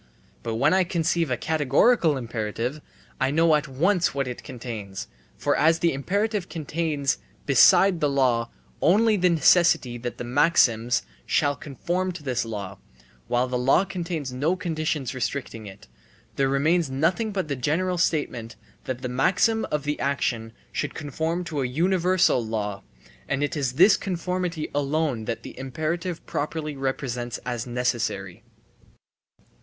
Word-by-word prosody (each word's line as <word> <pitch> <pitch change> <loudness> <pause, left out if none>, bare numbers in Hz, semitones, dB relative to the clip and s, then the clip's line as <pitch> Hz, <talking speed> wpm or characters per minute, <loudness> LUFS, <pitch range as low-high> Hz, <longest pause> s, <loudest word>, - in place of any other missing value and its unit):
But 115 -1 -3
when 125 +9 +3
I 190 0 +4
conceive 170 -2 0
a 125 - 0
categorical 160 - +3
imperative, 120 +3 -3 0.4
I - - +2
know 160 +3 +3
at 150 -1 +2
once 170 +6 +1
what 135 -2 -1
it 125 - -6
contains. 110 -6 -7 0.3
For - - +1
as 160 +2 +4
the 170 -1 +1
imperative 200 +7 -1
contains 155 -3 -1 0.3
besides 175 +7 +6
the 150 - +2
law 125 -4 +1 0.3
only 215 +7 +4
the 180 -2 +3
necessity 160 -7 +4
that 120 0 -5
the - - -5
maxims 120 -3 +3
* - - -32
shall 145 -1 +2
conform 175 +7 -3
to 170 -4 -9
this 125 -3 -1
law, 100 -4 -6 0.5
while 125 +1 +1
the 125 0 -2
law 135 +9 +3
contains 165 -8 -4
no 150 +8 +1
conditions 155 -6 -2
restricting 125 -4 -4
it, 100 0 -12 0.5
there 135 -1 +1
remains 155 +4 +2
nothing 165 - 0
but 190 -5 -2
the 140 - -2
general 170 +7 0
statement 125 -9 -1 0.3
that 130 0 -4
the - - -1
maxim 185 - +2
of 150 -1 -1
the 150 0 -2
action 120 -5 -1 0.2
should - - -3
conform 160 +4 -2
to 155 -5 -3
a 130 - 0
universal 175 0 +2
law, 105 -3 -3 0.5
and 140 +1 0
it 145 - -1
is 135 -4 -1
this 185 +9 +6
conformity 180 -3 -3
alone 145 -4 0
that 115 0 -4
the - - -9
imperative 160 +6 -3
properly 150 0 -3
represents 125 -3 -3
as 120 -1 -3
necessary. 115 -6 -2
145 Hz, 150 wpm, -25 LUFS, 125-170 Hz, 0.5 s, besides